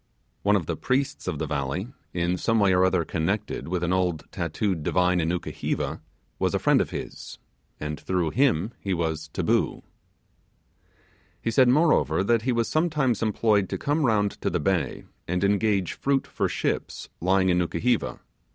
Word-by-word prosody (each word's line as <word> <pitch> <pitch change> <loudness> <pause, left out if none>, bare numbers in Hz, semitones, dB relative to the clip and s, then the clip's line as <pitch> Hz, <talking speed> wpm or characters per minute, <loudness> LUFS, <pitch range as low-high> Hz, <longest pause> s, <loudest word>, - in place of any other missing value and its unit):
One 105 +1 +3
of 90 -5 0
the - - -2
priests 135 +1 -1
of - - -1
the - - -2
valley, 70 - -2 0.2
in 85 +1 0
some 115 +5 +1
way 100 -2 +4
or 90 0 +4
other 95 -3 +2
connected 95 +7 -2
with 90 0 -2
an 85 +1 +1
old 90 -4 0
tattooed 85 +1 -2
divine 90 +3 +2
in 80 -1 0
Nukuheva, 90 0 -3 0.4
was - - +1
a - - +3
friend - - +3
of - - -2
his, - - -7 0.4
and 75 0 -4
through 90 -4 -1
him 115 - +2
he 95 -2 -1
was 80 -2 -2
'taboo'. - - 0 1.6
He 115 - -2
said, 125 +2 +5
moreover, 130 - +3
that 115 +2 +2
he 125 +3 0
was 115 -1 +1
sometimes 150 - +1
employed 105 -3 +2
to - - -2
come 150 +2 0
round 105 -5 +1
to - - 0
the 90 - -1
bay, 85 -4 -1 0.2
and 90 +2 -1
engage 100 -2 +1
fruit 140 -1 0
for - - -2
ships - - -3
lying 95 +1 +2
in 90 0 +3
Nukuheva. 100 +7 0
95 Hz, 170 wpm, -26 LUFS, 85-115 Hz, 1.6 s, said